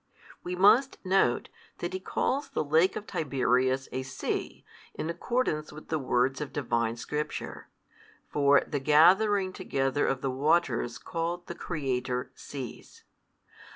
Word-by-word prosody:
We 180 Hz, +1 st, -3 dB
must 230 Hz, +9 st, +5 dB
note, 185 Hz, -10 st, +2 dB, 0.3 s
that 175 Hz, +1 st, -4 dB
he 185 Hz, -, -2 dB
calls 275 Hz, +8 st, -1 dB
the -, -, -1 dB
Lake 160 Hz, +5 st, +3 dB
of 210 Hz, -, -5 dB
Tiberias 130 Hz, -3 st, +1 dB
a 130 Hz, -, -2 dB
sea, 135 Hz, +1 st, -4 dB, 0.3 s
in 160 Hz, -, -3 dB
accordance 170 Hz, -5 st, -1 dB
with 155 Hz, +1 st, -12 dB
the 160 Hz, -, 0 dB
words 130 Hz, +1 st, +1 dB
of 150 Hz, -, -4 dB
Divine 115 Hz, -5 st, -1 dB
Scripture, 150 Hz, +5 st, -5 dB, 0.6 s
for 145 Hz, -1 st, +4 dB
the 145 Hz, -, -2 dB
gathering 185 Hz, +7 st, +4 dB
together 135 Hz, -2 st, 0 dB
of 135 Hz, -1 st, -1 dB
the 135 Hz, -, -1 dB
waters 135 Hz, -4 st, +1 dB
called 170 Hz, +1 st, -3 dB
the -, -, -6 dB
Creator 130 Hz, -7 st, -3 dB
Seas. 130 Hz, -5 st, -9 dB
150 Hz, 135 wpm, -29 LUFS, 130-175 Hz, 0.6 s, must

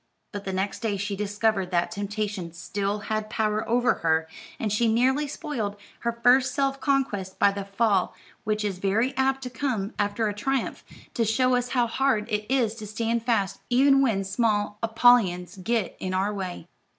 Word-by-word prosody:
But 205 Hz, -3 st, -6 dB
the 190 Hz, -, -2 dB
next 190 Hz, +1 st, -2 dB
day 215 Hz, -4 st, -1 dB
she 200 Hz, +1 st, -3 dB
discovered 205 Hz, -1 st, 0 dB
that 175 Hz, -1 st, 0 dB
temptation 205 Hz, -3 st, -4 dB
still 200 Hz, +4 st, -3 dB
had 215 Hz, 0 st, -3 dB
power 215 Hz, 0 st, -1 dB
over 245 Hz, +2 st, +3 dB
her, 160 Hz, -1 st, +2 dB, 0.3 s
and 215 Hz, -2 st, -1 dB
she 225 Hz, +1 st, +2 dB
nearly 265 Hz, +6 st, +2 dB
spoiled 275 Hz, -9 st, -4 dB, 0.2 s
her 235 Hz, -, -1 dB
first 255 Hz, +1 st, +5 dB
self 275 Hz, -1 st, 0 dB
conquest 215 Hz, -10 st, -1 dB
by 200 Hz, -, +4 dB
the 200 Hz, 0 st, -5 dB
fall 200 Hz, -1 st, +1 dB, 0.3 s
which 215 Hz, -1 st, -1 dB
is 195 Hz, -3 st, -3 dB
very 225 Hz, +8 st, +1 dB
apt 265 Hz, 0 st, +1 dB
to 250 Hz, -, -5 dB
come 230 Hz, -5 st, -2 dB
after 205 Hz, +2 st, 0 dB
a 205 Hz, -, -1 dB
triumph, 265 Hz, +5 st, -2 dB, 0.3 s
to 235 Hz, -, +1 dB
show 255 Hz, +4 st, +2 dB
us 245 Hz, 0 st, +1 dB
how 240 Hz, -, +4 dB
hard 235 Hz, -2 st, +1 dB
it 210 Hz, +2 st, -2 dB
is 245 Hz, -5 st, +2 dB
to 215 Hz, -2 st, -7 dB
stand 230 Hz, +2 st, -1 dB
fast, 225 Hz, -5 st, 0 dB
even 270 Hz, +2 st, +5 dB
when 220 Hz, -7 st, +1 dB
small 205 Hz, 0 st, 0 dB
Apollyons 225 Hz, -6 st, +3 dB
get 210 Hz, +1 st, -1 dB
in 185 Hz, 0 st, -3 dB
our 195 Hz, +3 st, 0 dB
way. 185 Hz, -4 st, -5 dB
215 Hz, 180 wpm, -26 LUFS, 200-245 Hz, 0.3 s, first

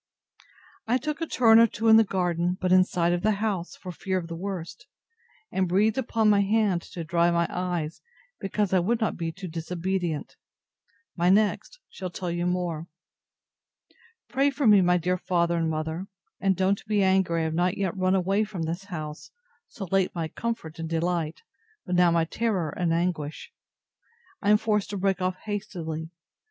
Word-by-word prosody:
I 245 Hz, +3 st, +3 dB
took 300 Hz, +5 st, -4 dB
a 330 Hz, -, -1 dB
turn 225 Hz, -5 st, +6 dB
or 230 Hz, -, +7 dB
two 225 Hz, +1 st, -3 dB
in 220 Hz, 0 st, +8 dB
the 225 Hz, -, +7 dB
garden, 180 Hz, -2 st, -1 dB
but 185 Hz, -1 st, 0 dB
in 185 Hz, 0 st, +7 dB
sight 175 Hz, -2 st, 0 dB
of 175 Hz, -, -1 dB
the 215 Hz, +2 st, +2 dB
house, 200 Hz, -4 st, -2 dB
for 185 Hz, -, -8 dB
fear 185 Hz, +2 st, -2 dB
of 170 Hz, -2 st, -5 dB
the 165 Hz, -, -5 dB
worst; 180 Hz, -1 st, -6 dB, 0.6 s
and 185 Hz, -2 st, 0 dB
breathed 210 Hz, +6 st, +2 dB
upon 225 Hz, -3 st, +1 dB
my 205 Hz, -1 st, +5 dB
hand 200 Hz, -3 st, +2 dB
to 170 Hz, -, -4 dB
dry 170 Hz, +1 st, +2 dB
my 170 Hz, 0 st, +2 dB
eyes, 175 Hz, -3 st, -3 dB, 0.4 s
because 195 Hz, 0 st, -1 dB
I 185 Hz, -, +5 dB
would 225 Hz, +7 st, +1 dB
not 220 Hz, -, 0 dB
be 165 Hz, -1 st, -3 dB
too 185 Hz, +3 st, -8 dB
disobedient. 170 Hz, 0 st, -3 dB, 0.8 s
My 175 Hz, 0 st, +2 dB
next 210 Hz, -, +2 dB
shall 185 Hz, -1 st, -6 dB
tell 175 Hz, 0 st, -4 dB
you 175 Hz, +1 st, -1 dB
more. 175 Hz, -3 st, -2 dB, 1.4 s
Pray 270 Hz, +4 st, +2 dB
for 280 Hz, 0 st, -2 dB
me, 210 Hz, -3 st, +7 dB
my 180 Hz, 0 st, +4 dB
dear 180 Hz, +2 st, -1 dB
father 170 Hz, -1 st, +1 dB
and 165 Hz, -1 st, 0 dB
mother: 160 Hz, +4 st, -3 dB, 0.3 s
and 195 Hz, -1 st, +2 dB
don't 190 Hz, +1 st, +1 dB
be 205 Hz, -2 st, +2 dB
angry 190 Hz, -3 st, +2 dB
I -, -, 0 dB
have 160 Hz, 0 st, -1 dB
not 175 Hz, +3 st, +1 dB
yet 195 Hz, -2 st, -1 dB
run 185 Hz, 0 st, +2 dB
away 195 Hz, +3 st, +2 dB
from 200 Hz, -6 st, -5 dB
this 170 Hz, +4 st, -4 dB
house, 155 Hz, -5 st, -7 dB, 0.4 s
so 200 Hz, -, -7 dB
late 195 Hz, -2 st, +1 dB
my 165 Hz, -2 st, -2 dB
comfort 225 Hz, -9 st, -5 dB
and 165 Hz, 0 st, -4 dB
delight, 165 Hz, -1 st, -1 dB, 0.4 s
but 180 Hz, -, -3 dB
now 180 Hz, -1 st, +5 dB
my 165 Hz, -1 st, +2 dB
terror 190 Hz, -5 st, -1 dB
and 175 Hz, 0 st, -1 dB
anguish. 165 Hz, -3 st, -2 dB, 0.9 s
I 205 Hz, -, +1 dB
am 210 Hz, -, +7 dB
forced 210 Hz, -2 st, 0 dB
to 205 Hz, -, -4 dB
break 195 Hz, 0 st, 0 dB
off 185 Hz, 0 st, 0 dB
hastily. 175 Hz, -7 st, -4 dB
185 Hz, 185 wpm, -26 LUFS, 170-205 Hz, 1.4 s, in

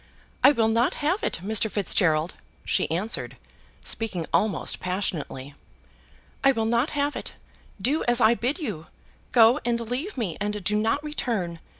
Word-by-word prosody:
"I 275 Hz, -, +9 dB
will 230 Hz, -6 st, +2 dB
not 230 Hz, +2 st, +2 dB
have 365 Hz, +8 st, +1 dB
it, -, -, -1 dB
Mr. 220 Hz, +2 st, +2 dB
Fitzgerald," 175 Hz, -5 st, +1 dB, 0.3 s
she -, -, +1 dB
answered, 190 Hz, +8 st, -2 dB, 0.5 s
speaking 200 Hz, -7 st, -2 dB
almost 210 Hz, -6 st, +1 dB
passionately. 165 Hz, -7 st, -3 dB, 0.9 s
"I 275 Hz, 0 st, +5 dB
will 225 Hz, -2 st, -1 dB
not 235 Hz, +5 st, +1 dB
have 285 Hz, +1 st, 0 dB
it. -, -, -6 dB, 0.5 s
Do 270 Hz, +10 st, +1 dB
as 240 Hz, 0 st, +5 dB
I 230 Hz, -1 st, +6 dB
bid 245 Hz, +6 st, -1 dB
you. 210 Hz, -, -5 dB, 0.4 s
Go 235 Hz, +3 st, +6 dB
and 235 Hz, -1 st, 0 dB
leave 250 Hz, -, -4 dB
me, 205 Hz, -9 st, -2 dB
and 210 Hz, -1 st, -2 dB
do 210 Hz, +3 st, +1 dB
not 225 Hz, +7 st, +1 dB
return. 220 Hz, -, -3 dB
225 Hz, 155 wpm, -25 LUFS, 190-250 Hz, 0.9 s, I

